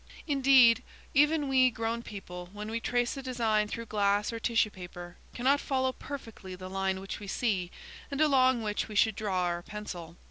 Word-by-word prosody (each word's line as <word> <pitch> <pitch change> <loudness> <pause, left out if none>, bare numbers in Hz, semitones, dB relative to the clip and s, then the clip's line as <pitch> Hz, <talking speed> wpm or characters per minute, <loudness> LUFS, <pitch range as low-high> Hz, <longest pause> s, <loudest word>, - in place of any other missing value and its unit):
Indeed, 265 -5 +6 0.3
even 295 +1 +3
we 260 -1 +5
grown 230 0 -3
people, 180 -5 -8
when 210 +1 -6
we 230 - -1
trace 245 +2 0
a - - -4
design 230 -5 +1
through 230 +2 -5
glass 205 0 +1
or 230 - -4
tissue 225 -2 +2
paper, 175 -1 -9 0.2
cannot 270 +4 +3
follow 260 -1 0
perfectly 225 -9 -8
the 185 0 -9
line 190 0 -1
which 195 +1 -6
we 205 - -9
see 195 -4 -1 0.4
and 280 - -4
along 260 -5 +4
which 210 -1 -2
we 215 - -8
should 220 +1 +3
draw 200 -4 -1
our 175 -1 -1
pencil. 175 -4 -8
220 Hz, 180 wpm, -30 LUFS, 195-255 Hz, 0.4 s, Indeed